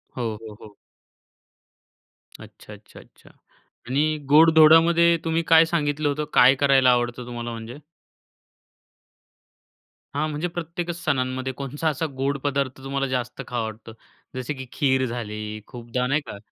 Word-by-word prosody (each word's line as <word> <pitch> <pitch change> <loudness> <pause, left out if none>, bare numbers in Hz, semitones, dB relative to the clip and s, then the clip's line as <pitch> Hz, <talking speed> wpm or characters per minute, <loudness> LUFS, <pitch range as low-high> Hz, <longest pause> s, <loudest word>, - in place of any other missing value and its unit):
हो, 125 - -4 0.2
हो, 110 -2 -10
हो. 105 -1 -14 1.6
अच्छा, 105 - -13
अच्छा, 105 +1 -15
अच्छा. - - -20 0.6
आणि 150 +4 0
गोड-धोडामध्ये 165 +2 +6
तुम्ही 165 0 +1
काय 165 +1 +7
सांगितलं 150 -3 -1
होतं? 150 +1 -2
काय 130 +2 +6
करायला 135 -2 +4
आवडतं 120 0 -1
तुम्हाला 120 -1 -6
म्हणजे? 115 +4 -8 2.4
हां, 155 +2 0
म्हणजे 155 +3 -3
प्रत्येकच 170 0 -5
सणांमध्ये 130 -3 -1
कोणचा 140 +4 -4
असा 155 +2 -2
गोड 140 +1 -1
पदार्थ 140 -2 -1
तुम्हाला 135 0 -2
जास्त 125 0 -4
खावा 120 -2 -2
वाटतो? 110 +1 -9 0.4
जसे 130 +3 -4
की 130 -2 -8
खीर 130 -3 +1
झाली 110 -3 -5
खूपदा, 125 0 -4
नाही 145 +4 +1
का? - - -7
135 Hz, 130 wpm, -23 LUFS, 120-155 Hz, 2.4 s, काय